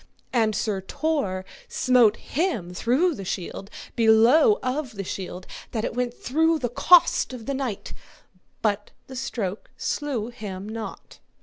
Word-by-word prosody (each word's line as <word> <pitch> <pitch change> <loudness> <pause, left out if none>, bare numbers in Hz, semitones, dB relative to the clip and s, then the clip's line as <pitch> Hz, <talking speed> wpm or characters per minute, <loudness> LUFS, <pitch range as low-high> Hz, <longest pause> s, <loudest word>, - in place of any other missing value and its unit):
And 220 -3 +2
Sir 205 -2 -1
Tor 195 -6 -1 0.2
smote 245 -4 +4
him 255 - -2
through 265 - +2
the 200 - -7
shield 190 +1 -5 0.3
below 235 - +6
of 255 0 -2
the 195 - -4
shield 185 0 -6 0.3
that 220 -2 -1
it - - -3
went 245 0 -1
through 320 +5 +2
the 250 -5 -2
cost 340 +2 +5
of 235 -3 -8
the 280 - -2
knight, 260 -7 -4 0.7
but 205 -1 0 0.2
the 265 - -10
stroke 220 -6 -4
slew 260 -7 -2
him 205 -5 -7
not. 220 0 -7
235 Hz, 140 wpm, -25 LUFS, 205-270 Hz, 0.7 s, below